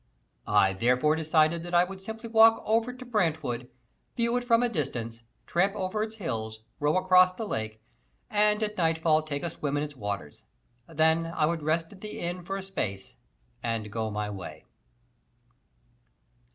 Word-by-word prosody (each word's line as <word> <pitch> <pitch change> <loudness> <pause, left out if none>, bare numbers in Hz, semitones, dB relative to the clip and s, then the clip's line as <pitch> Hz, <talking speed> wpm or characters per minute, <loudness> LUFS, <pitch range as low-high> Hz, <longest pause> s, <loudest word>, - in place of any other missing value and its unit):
I 95 0 +4
therefore 125 +9 +2
decided 160 +1 +2
that 175 +1 -4
I 175 - +6
would 190 +1 -7
simply 220 +3 -7
walk 225 0 +6
over 225 +2 +2
to 255 0 -10
Brantwood, 155 - -1 0.5
view 235 0 +1
it 245 - 0
from 235 -1 +3
a - - +3
distance, 120 - -3 0.2
tramp 195 +4 +1
over 190 +2 -2
its 220 0 -3
hills, 110 - -4 0.2
row 150 +4 +2
across 185 0 +5
the 220 +4 -5
lake, 110 - -4 0.5
and 210 0 +3
at 210 -2 -2
nightfall 160 -1 +3
take 145 -2 -5
a 170 - 0
swim 145 -1 -2
in 145 - 0
its 145 -1 -6
waters. 100 - -5 0.5
Then 160 +1 +2
I 165 -2 0
would 165 0 -1
rest 165 +3 -1
at 190 - -16
the 215 - -6
Inn 175 +1 -3
for 195 +3 -4
a 195 - -5
space 100 - -4 0.5
and 110 -2 -3
go 110 0 -2
my 105 0 -3
way. 100 -3 -8
165 Hz, 170 wpm, -28 LUFS, 125-205 Hz, 0.5 s, I